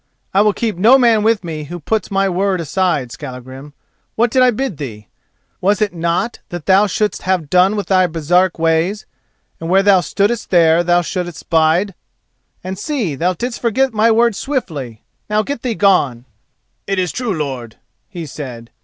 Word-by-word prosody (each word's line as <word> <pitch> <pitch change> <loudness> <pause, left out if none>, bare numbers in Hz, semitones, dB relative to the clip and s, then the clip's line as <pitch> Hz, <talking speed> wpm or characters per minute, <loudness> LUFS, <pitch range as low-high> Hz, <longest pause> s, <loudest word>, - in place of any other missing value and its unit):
"I 195 - +4
will 210 0 +4
keep 220 -4 -2
no 230 +8 +6
man 235 -4 +4
with 220 -1 +1
me 155 -3 -5
who 175 +4 -7
puts 215 +5 -2
my 195 0 +1
word 190 0 0
aside, 165 -6 -1
Skallagrim. 130 +1 -9 0.4
What 235 +1 +2
did 260 - +3
I 255 - +6
bid 245 - -2
thee? 110 -7 -8 0.5
Was 200 +2 +2
it 210 -3 0
not 170 +7 -1
that 175 -3 -7
thou 195 +2 +4
shouldst 210 +1 -1
have 180 -5 -1
done 185 +3 +4
with 205 -2 -2
the 185 -2 +3
Baresark 175 +3 +1
ways, 165 +5 0 0.5
and 165 - -5
where 190 +2 +4
thou 195 -2 +5
stoodest 205 +5 -1
there 170 -1 +4
thou 175 0 +2
shouldst 175 -4 -5
bide? 165 +5 +2 0.7
and 185 +1 -5
see: 235 - -2
thou 175 +6 0
didst 240 +7 -4
forget 250 +2 +1
my 220 +1 +3
word 230 -1 +3
swiftly! 155 - -4 0.3
Now 210 0 +1
get 280 -2 -5
thee 240 -3 -2
gone!" 145 - +2 0.6
"It 195 - -1
is 180 -3 0
true, 240 -6 -2
lord," 130 -7 -5 0.3
he 175 -5 -7
said. 125 -5 -8
185 Hz, 180 wpm, -17 LUFS, 160-215 Hz, 0.7 s, no